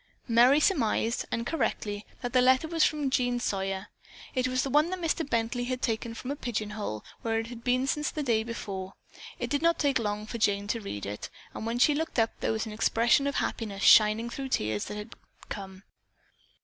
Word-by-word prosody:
Merry 245 +4 +6
surmised, 235 - +1
and 230 0 -1
correctly, 210 -8 -2 0.2
that 245 0 -3
the 255 - +5
letter 260 +4 +4
was 325 -1 +2
from 295 -3 +1
Jean 245 -1 +1
Sawyer. 195 -3 -2 0.4
It 255 -1 +1
was 255 0 0
the 270 - -3
one 300 +4 +4
Mr. 340 -2 -1
Bently 235 -2 -1
had 255 0 -2
taken 230 0 -1
from 250 +4 -5
a - - -2
pigeon 220 -6 -3
hole 205 - -5 0.2
where 225 -1 0
it 225 - -1
had 230 0 -9
been 255 +1 +2
since 295 +2 0
the 305 - -3
day 230 -5 +2
before. 195 -5 -5 0.4
It - - -4
did 285 0 +1
not 335 +1 +3
take 280 -4 +2
long 210 -1 -2
for 230 +2 -6
Jane 205 -2 +2
to 230 +1 -1
read 105 - -5
it, 105 +1 -5 0.2
and 220 - -5
when 230 +1 -1
she 295 +4 +5
looked 320 +1 -3
up 225 -1 +3
there - - 0
was 220 0 -1
an 220 - -6
expression 235 +5 +3
of 280 - -2
happiness 200 -4 -2
shining 220 +2 +6
through 275 - -5
the - - +3
tears 105 -1 -2
that 210 - -6
had 210 +2 -7 0.4
come. 190 -1 -7
235 Hz, 215 wpm, -28 LUFS, 210-265 Hz, 0.4 s, Merry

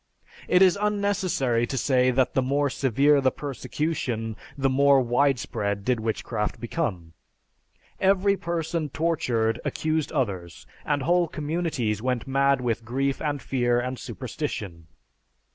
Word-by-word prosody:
It 180 +1 +5
is 190 +1 +4
unnecessary 195 - +1
to 135 - -3
say 130 0 +3
that 130 0 +1
the 130 - +2
more 140 +2 +1
severe 140 +3 +3
the 130 - +4
persecution, 130 -5 -3 0.2
the 135 -1 +2
more 140 +1 +5
widespread 120 -6 0
did 125 -2 +1
witchcraft 110 -1 -2
become. 105 - -3 0.9
Every 195 +1 +3
person 165 -3 -2
tortured 125 -8 0
accused 155 -1 -1
others 95 - -3 0.2
and 145 -2 0
whole 175 +3 +3
communities 150 - -2
went 125 -1 -1
mad 140 0 +2
with 115 -2 -1
grief 135 +4 -1
and 145 -3 -2
fear 120 -2 +1
and 125 +1 -3
superstition. 110 - -5
135 Hz, 125 wpm, -25 LUFS, 120-155 Hz, 0.9 s, It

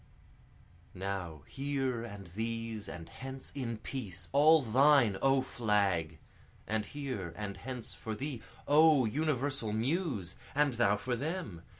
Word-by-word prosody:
Now 90 -6 -4
here 135 -3 -2
and 100 -4 -8
these 115 +2 -4
and 85 -1 -7
hence 135 0 -8
in 120 -5 -3
peace, 105 -6 -6
all 150 +2 +6
thine 130 -2 +5
O 135 -1 +4
Flag! 100 -10 +1 0.5
And 110 -1 -1
here 125 - -5
and 105 -2 -4
hence 125 +4 -6
for 110 -1 -5
thee, 135 -1 -4 0.3
O 150 -3 +6
universal 135 -2 0
Muse! 115 - -1 0.2
and 145 -2 +3
thou 105 -3 +3
for 125 +4 -2
them! 145 - -4
115 Hz, 125 wpm, -32 LUFS, 100-140 Hz, 0.5 s, all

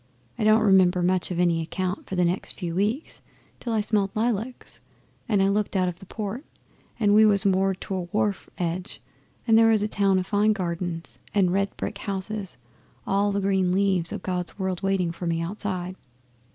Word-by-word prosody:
I - - 0
don't 215 +1 +5
remember 185 -3 +4
much 180 0 +2
of 175 -2 -3
any 170 -2 +2
account 185 +4 -3
for 190 - -4
the 180 -1 +3
next 175 +2 -2
few 175 -3 -5
weeks, 210 - -2 0.4
till 235 - -4
I 220 -1 +2
smelled 205 -2 +1
lilacs, 230 +2 -2 0.5
and 205 -3 +3
I - - +3
looked 205 +1 0
out 185 -1 +2
of 180 0 -4
the 195 - -13
port, 215 +6 -5 0.6
and 205 -3 +3
we 215 +1 +7
was 205 -1 +4
moored 190 0 +2
to - - -5
a 185 - -1
wharf 205 -1 -1
edge 180 +1 -3 0.5
and 225 -1 +5
there 225 0 +6
was 215 -2 +3
a - - +1
town 200 -2 +2
o' 185 - +1
fine 205 +2 +2
gardens 175 -3 -4 0.2
and 185 -3 +3
red 200 +1 -1
brick 200 - -4
houses 200 0 -4 0.5
and - - -2
all 200 +1 +2
the 200 0 -1
green 190 -2 +1
leaves 190 -3 +2
o' - - -3
God's 180 -1 -3
world 190 -2 -2
waiting 195 -3 +1
for 175 +1 -5
me 165 0 0
outside. 185 0 -4
195 Hz, 200 wpm, -25 LUFS, 180-210 Hz, 0.6 s, we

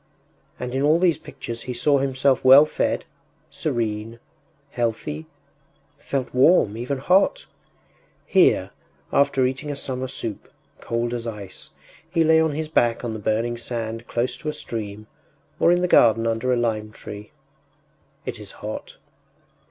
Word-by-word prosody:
And 125 0 -4
in 135 - 0
all 150 +3 +4
these 170 -3 +2
pictures 115 -6 -7
he 125 - -3
saw 140 +3 +3
himself 135 0 +1
well 135 +3 +9
fed, 155 - -1 0.5
serene, 115 0 -3 0.5
healthy, 110 -10 -3 0.7
felt 135 -3 -3
warm, 130 - +4
even 125 +4 -3
hot! 180 +9 +2 0.8
Here, - - +3 0.4
after 140 -2 +3
eating 130 +3 -3
a 145 - -3
summer 130 -2 -4
soup, 115 -4 -6 0.3
cold 120 +1 -2
as 120 -1 -4
ice, 105 -4 -7 0.4
he 165 -1 +2
lay 160 0 +5
on 160 -2 +1
his 155 +1 -3
back 120 -6 +1
on 115 - -3
the 110 - -5
burning 115 +3 -1
sand 115 -1 -4
close 120 +2 -1
to 155 - -4
a - - -3
stream 110 -4 -6 0.5
or 170 - +5
in 175 0 +2
the - - +3
garden 115 -8 +5
under 115 +2 0
a 125 - +2
lime 110 -3 -1
tree.... 105 0 -9 1.0
It - - -5
is - - -9
hot.... - - -7
120 Hz, 150 wpm, -23 LUFS, 115-140 Hz, 1.0 s, well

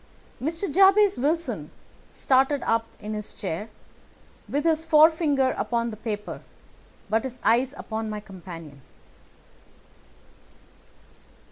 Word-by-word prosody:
Mr. 325 +7 -2
Jabez 390 -1 +5
Wilson 320 +6 -1 0.4
started 270 +1 +2
up 225 0 +1
in 215 0 -5
his 210 0 -6
chair, 190 +3 -4 0.8
with 290 +1 -1
his 320 -1 +2
forefinger 305 -4 +4
upon 235 -1 -1
the - - -7
paper, 215 -1 -5 0.7
but 220 +2 +1
his 255 -1 -6
eyes 250 +4 +3
upon 220 -1 -4
my 210 0 -4
companion. 170 -8 -11
245 Hz, 105 wpm, -25 LUFS, 215-310 Hz, 0.8 s, Jabez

